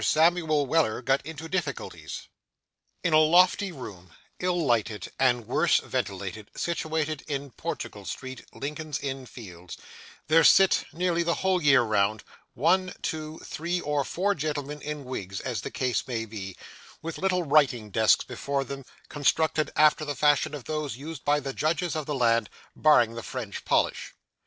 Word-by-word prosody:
SAMUEL 160 -2 +3
WELLER 135 -6 +1
GOT 135 +1 +2
INTO 160 +2 -7
DIFFICULTIES 160 -7 -4 0.8
In 170 - +1
a 155 - +7
lofty 180 +5 +4
room, 95 - -10 0.3
ill 175 -2 0
lighted 110 -5 0
and 120 -3 +3
worse 155 +8 +3
ventilated, 100 -4 -4
situated 155 -3 -2
in 140 -2 -4
Portugal - - -5
Street, 130 0 -6
Lincoln's 150 +1 -4
Inn 135 -2 -5
Fields, 90 -8 -10 0.5
there 165 +1 +5
sit 195 +4 +6
nearly 175 0 0
the 170 0 +1
whole 185 -1 +3
year 140 -4 +5
round, 105 -1 +1 0.3
one, 185 +1 +2
two, 155 0 -4
three, 175 +3 -2
or 145 -3 0
four 195 +8 0
gentlemen 150 -2 -4
in 150 -2 -5
wigs, 100 -7 -5
as 125 -4 -3
the - - -5
case 130 -1 -1
may 115 -3 -2
be, 100 -4 -7 0.5
with 165 0 -5
little 185 -1 +1
writing 135 -8 +3
desks 110 +2 +4
before 140 -1 -2
them, 135 0 -7 0.2
constructed 155 +1 +1
after 155 0 +5
the 145 -1 -3
fashion 145 0 +3
of 140 - -8
those 150 -5 -3
used 150 0 -8
by 145 +1 +3
the 135 -1 -5
judges 165 +4 0
of 155 -2 -3
the 150 - -1
land, 115 -3 +2 0.3
barring 120 -7 +4
the 115 - -6
French 115 -6 -6
polish. - - 0
145 Hz, 155 wpm, -27 LUFS, 120-160 Hz, 0.8 s, a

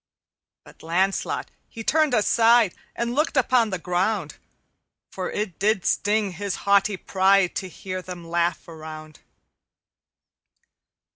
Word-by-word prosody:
"But - - -17
Lancelot 185 +4 -1 0.2
he 225 - -8
turned 305 0 +2
aside 225 -1 +4 0.2
And 235 0 -2
looked 300 +1 0
upon 250 -3 +3
the 190 - -2
ground, 180 -1 -1 0.7
For 185 -1 -4
it 205 -6 -4
did 200 -2 +1
sting 205 -1 +1
his 195 +2 -4
haughty 200 0 +3
pride 190 0 +2
To 190 - -4
hear 185 +2 -6
them 180 -2 -9
laugh 170 0 -1
around. 155 -2 -10
195 Hz, 120 wpm, -24 LUFS, 175-220 Hz, 0.7 s, aside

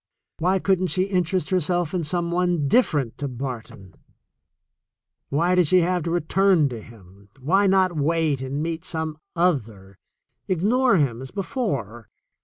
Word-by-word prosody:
Why 185 +4 +2
couldn't 185 -1 +1
she 185 +1 +1
interest 185 -2 -1
herself 175 -2 0
in 180 -2 -1
some 170 +2 -1
one 175 -4 +1
different 145 - +1
to 145 - -2
Barton? 120 -7 -7 1.4
Why 170 +6 +1
did 180 -3 +3
she 185 +3 +5
have 180 +1 0
to - - -1
return 175 -1 +2
to 120 -3 -7
him? 100 -3 -17
Why 190 +9 +2
not 190 -2 +3
wait 155 -2 0
and 135 +3 -3
meet 165 0 -4
some 160 -3 -4 0.2
other 110 - -1 0.2
— - - -53
ignore 215 +6 +2
him 130 -6 0
as 130 - -7
be 200 0 -4
fore? 130 - -4
165 Hz, 155 wpm, -23 LUFS, 135-185 Hz, 1.4 s, she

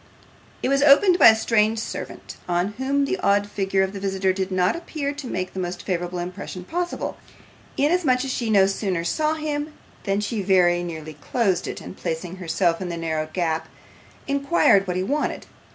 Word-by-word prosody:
It - - +1
was 275 0 +2
opened 350 +6 +6
by - - +9
a 220 - +8
strange 220 0 +2
servant, 220 - -6
on 175 +2 +1
whom 280 +2 +1
the 375 +7 -2
odd 200 0 +2
figure 195 -1 0
of 190 +1 -3
the 200 - -5
visitor 190 -1 0
did 190 0 -3
not 185 -1 +2
appear 305 -4 -4
to 285 -2 -7
make 185 -4 -3
the 190 - -5
most 175 -1 -4
favourable 180 -1 -2
impression 180 +1 -6
possible, 350 - -3 0.6
inasmuch 285 -4 +2
as 265 - -3
she 235 -3 -2
no 200 -3 +5
sooner 195 -3 -1
saw 305 - 0
him 300 -1 -3 0.3
than 195 -1 +1
she 210 +1 -2
very 180 -2 +3
nearly 160 -3 -6
closed 185 - -1
it, - - -5
and - - -10
placing 170 +3 -4
herself 170 -1 0
in 180 - -3
the 170 - -4
narrow 160 -2 -2
gap, 160 -2 -1 0.6
inquired 280 - +3
what 180 0 -1
he 185 - 0
wanted. 290 +9 -2
195 Hz, 185 wpm, -23 LUFS, 180-275 Hz, 0.6 s, by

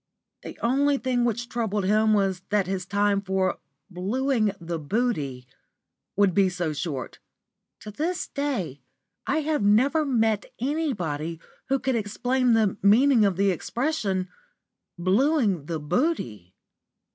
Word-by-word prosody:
The - - -9
only 280 +4 +2
thing 255 -2 0
which 240 +1 -1
troubled 220 -4 -2
him 215 +2 +3
was 195 -3 0
that 205 -2 +2
his 185 -1 -3
time 200 0 +1
for 190 -1 -1 0.3
"blueing 215 +4 0
the 170 0 -4
booty" 150 - -2 0.7
would 200 -2 +3
be 195 +1 +4
so 175 -4 -2
short. 145 -4 -5 0.6
To 210 - -8
this 330 - -2
day 215 - -3 0.5
I 310 +3 +1
have 305 -2 0
never 255 +10 +3
met 225 -7 +1
anybody 185 - -2 0.3
who 270 - +3
could 265 0 -1
explain 245 +3 +1
the 220 -4 +2
meaning 230 +3 +5
of 195 -3 +1
the 200 0 +3
expression 200 - -2 0.7
"blueing 200 - +2
the 165 -2 -3
booty." 145 - -2
210 Hz, 130 wpm, -25 LUFS, 185-255 Hz, 0.7 s, meaning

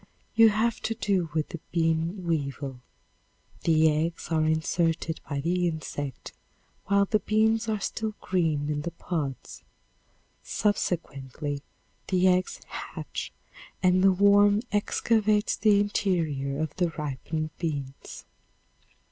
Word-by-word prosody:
You 225 -1 +7
have 220 +2 +1
to 225 - -2
do 195 -6 0
with 155 -1 0
the 170 - -6
bean 165 +2 0
weevil. 140 -5 -2 0.8
The 160 -1 +5
eggs 160 +3 -2
are 160 -2 +2
inserted 160 +1 0
by 140 -2 -2
the 175 +3 +1
insect 145 -4 -5 0.5
while 200 0 +4
the 215 +2 +1
beans 220 +2 +2
are 215 -1 0
still 215 +2 -3
green 160 -6 0
in 145 0 -1
the 170 - -3
pods; 160 -5 -5 0.8
subsequently 145 - -2 0.5
the 185 -1 +3
eggs 185 0 +1
hatch - - -6 0.5
and 185 0 +4
the 195 - +7
worm 205 +2 +5
excavates 210 0 +2
the 210 -1 +4
interior 160 -9 0
of 155 -1 -2
the 175 -2 +2
ripened 155 +2 -3
beans. 140 -5 -5
170 Hz, 120 wpm, -27 LUFS, 155-205 Hz, 0.8 s, You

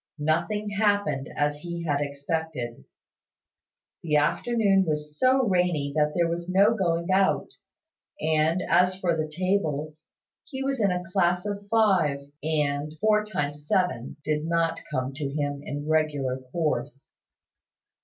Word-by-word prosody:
Nothing 170 +8 0
happened 205 -9 +1
as 145 0 0
he 170 +1 -5
had 145 -2 0
expected. 140 - -4 1.2
The 155 -3 0
afternoon 195 +6 +3
was 150 -3 -3
so 260 +1 +4
rainy 180 -7 +1
that 150 -1 +2
there 170 -1 +3
was 170 +1 -4
no 200 +4 +5
going 170 -3 0
out; 190 0 +2 0.7
and, 160 +3 +1
as 180 +2 +3
for 175 -3 +1
the 155 -1 -3
tables, 155 -4 -2 0.4
he 265 -3 -5
was 270 -3 -1
in 200 - +4
a 180 0 -1
class 180 -1 +2
of 200 -1 -4
five; 170 -11 +2
and 150 0 -1
"four 215 -1 +3
times 145 -8 -4
seven" 180 -11 0
did 150 0 0
not 165 0 +1
come 130 +1 -2
to 140 0 -3
him 145 0 -2
in 145 0 -5
regular 145 -5 0
course. 150 -4 -2
160 Hz, 135 wpm, -26 LUFS, 150-190 Hz, 1.2 s, no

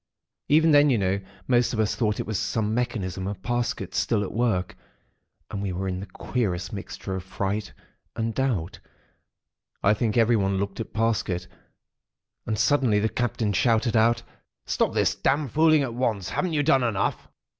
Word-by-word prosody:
"Even 160 +2 +5
then, 145 0 +6
you 125 - +3
know, 95 0 0 0.3
most 120 -1 +3
of 110 - -2
us 110 -1 +2
thought 105 -3 0
it - - -2
was 110 -3 -2
some 110 -1 -1
mechanism 100 -6 -2
of 100 -2 -6
Parsket's 115 -6 -1
still 105 +1 +1
at 95 - -5
work; 110 -6 0 0.8
and 100 - -3
we 100 -2 -2
were 95 +2 -3
in 90 -1 -2
the 100 - -7
queerest 100 -8 -3
mixture 100 -1 -6
of 95 - -4
fright 100 +3 -3 0.4
and 115 0 -2
doubt. 110 -11 -1 1.0
I 105 - +5
think 110 +1 -1
everyone 110 -4 +3
looked 100 +2 -3
at 115 - -5
Parsket. 110 -5 0 1.0
And 110 - -1
suddenly 125 -2 +3
the 110 +2 +1
Captain 115 -3 -1
shouted 115 +2 +2
out: 115 +1 +3 0.4
"'Stop - - 0
this - - +3
damned 140 -2 0
fooling 155 -1 +4
at 125 -4 -3
once. 110 -6 -1
Haven't 180 -3 -1
you 145 -1 +2
done 135 -3 +4
enough!' 115 -5 -1
110 Hz, 170 wpm, -25 LUFS, 100-120 Hz, 1.0 s, then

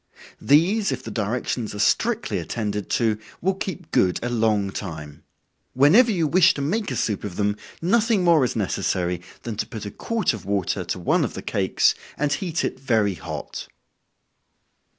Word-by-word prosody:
These, 185 - +3
if - - -4
the 110 - -7
directions 110 +1 -2
are - - -5
strictly 225 - +1
attended 105 -3 -3
to, 110 -5 +1 0.2
will 190 +3 +1
keep 185 -3 -6
good 90 -1 +2
a 120 - -1
long 110 -4 +1
time. 80 -7 -7 0.5
Whenever 185 - +6
you 170 -6 +1
wish 175 +3 +5
to 140 - -3
make 205 +8 -1
a - - -3
soup 105 -4 -1
of 100 -4 -5
them, 105 +1 0 0.3
nothing 220 +1 +3
more 170 -5 +5
is 125 - -1
necessary, 90 -4 -1 0.2
than 115 -3 -5
to - - -2
put 110 -3 -7
a 100 - -5
quart 230 - -1
of 105 -5 -7
water 100 -1 -1
to 85 - -3
one 90 - +1
of - - -3
the - - -6
cakes, - - +2 0.2
and 150 0 +1
heat 175 -1 -2
it - - -4
very 110 -7 +1
hot. 80 -4 -7
115 Hz, 175 wpm, -23 LUFS, -, 0.5 s, Whenever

